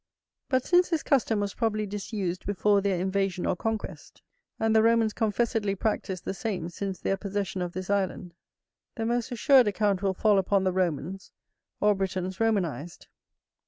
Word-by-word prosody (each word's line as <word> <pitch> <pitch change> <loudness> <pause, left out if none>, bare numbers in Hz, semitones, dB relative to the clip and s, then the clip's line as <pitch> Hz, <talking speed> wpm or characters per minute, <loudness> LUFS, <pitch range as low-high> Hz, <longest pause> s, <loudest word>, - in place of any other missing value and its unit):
But 260 -2 +1
since 355 0 +4
this 330 -3 0
custom 235 -6 +2
was 200 -1 -2
probably 215 -2 -1
disused 200 -3 -4
before 205 0 +2
their 195 -3 0
invasion 190 -1 -1
or - - +1
conquest, 220 +3 -5 0.4
and 225 0 +2
the 220 - +6
Romans 225 -1 +3
confessedly 220 -2 0
practised 195 -2 -2
the - - -2
same 190 -5 -3
since 195 +1 -5
their 195 - -1
possession 195 -2 -3
of 175 -1 -3
this 185 0 -5
island, 190 -3 -1 0.6
the 225 -3 -3
most 240 +1 -1
assured 250 +1 +5
account 205 -2 +1
will 195 -2 0
fall 205 0 +3
upon 195 +1 +1
the 185 -1 +1
Romans, 185 +1 -2 0.5
or 210 0 +4
Britons 190 -1 -3
Romanized. 180 -8 -1
200 Hz, 160 wpm, -27 LUFS, 190-225 Hz, 0.6 s, the